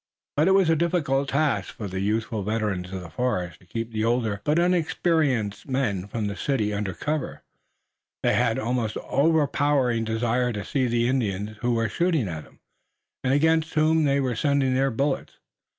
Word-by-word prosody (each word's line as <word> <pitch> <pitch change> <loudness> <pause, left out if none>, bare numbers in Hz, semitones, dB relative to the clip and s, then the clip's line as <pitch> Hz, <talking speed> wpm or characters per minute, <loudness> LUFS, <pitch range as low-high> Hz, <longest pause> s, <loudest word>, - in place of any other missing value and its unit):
But 150 +4 +3
it 190 - +5
was 195 -3 +4
a 165 - +4
difficult 150 -5 0
task 140 -9 0
for 105 - -5
the 95 0 -4
youthful 110 +2 -1
veterans 100 -3 -2
of 95 -1 -5
the 85 -2 -10
forest 90 -10 -2
to 90 - -22
keep 115 +4 -4
the 110 -1 -1
older 115 -3 0
but 150 +2 +1
inexperienced 160 - +1
men 105 -8 -1
from 110 0 -3
the 100 0 -3
city 110 -6 -1
under 100 -2 -3
cover. 150 -2 -3 0.8
They - - +3
had - - +2
an - - -3
almost 115 -3 -1
overpowering 145 -5 +2
desire 120 +2 0
to 100 -2 -5
see 135 -4 0
the 120 0 +1
Indians 105 -5 -1
who 120 +2 0
were 115 0 +1
shooting 160 - 0
at 80 -3 -6
them, - - -23 0.6
and 130 - +1
against 160 +3 +2
whom 155 0 +3
they 140 0 +2
were 130 -3 0
sending 140 +1 +1
their 135 +1 +2
bullets. 135 +4 -1
125 Hz, 180 wpm, -25 LUFS, 105-145 Hz, 0.8 s, it